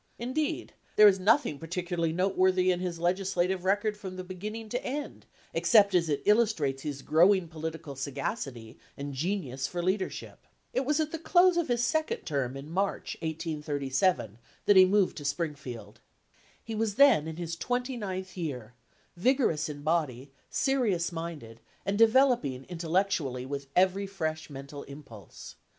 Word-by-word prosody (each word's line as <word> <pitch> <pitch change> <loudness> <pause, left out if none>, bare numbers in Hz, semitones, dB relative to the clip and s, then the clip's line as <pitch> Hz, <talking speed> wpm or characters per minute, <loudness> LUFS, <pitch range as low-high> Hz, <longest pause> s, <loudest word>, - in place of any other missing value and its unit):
Indeed, 260 +6 -2 0.2
there 210 - +9
is 195 -2 +4
nothing 210 - +2
particularly 170 0 -2
note 185 +4 0
worthy 185 0 +3
in 175 - -1
his 180 -2 -3
legislative 180 +1 0
record 205 +3 +1
from 190 -3 -8
beginning 195 +5 -6
to 245 +3 -3
end, 285 +3 -5 0.3
except 205 -4 +5
as 170 -3 +2
it 145 - -1
illustrates 205 - +2
his 140 -2 -5
growing 175 +3 +4
polit 160 0 -5
ical 145 -3 -9
sagacity 135 - -5 0.2
and 140 0 -5
genius 140 -3 -2
for 175 -1 -4
leadership. 190 +2 -3 0.3
It 260 - 0
was 300 +1 +2
at 310 -1 0
the 325 - -4
close 360 +1 +4
of 345 -2 +1
his 240 -1 +1
second 315 +9 0
term 135 -3 -2
in 135 +1 -8
March, 195 +3 -1
1837, 150 - -1 0.3
that 205 - +5
he 185 0 +9
moved 195 0 +2
to 150 - -6
Springfield. 145 -5 -4 0.6
He 225 - -6
was 215 -2 -1
then 260 - +6
in 160 - -5
his 170 0 -4
twenty 250 +6 -2
ninth 190 -4 -5
year, 130 - -5 0.4
vigorous 175 - +1
in 145 -1 -7
body, 145 -5 -1 0.2
serious 230 -12 +1
minded, 165 -9 -7 0.3
and 195 - 0
developing 225 - +3
intellectually 165 -7 -1
with 140 0 -5
every 190 +2 +3
fresh 160 -5 -4
mental 140 +1 -8
impulse. 135 - -12
180 Hz, 155 wpm, -29 LUFS, 145-210 Hz, 0.6 s, there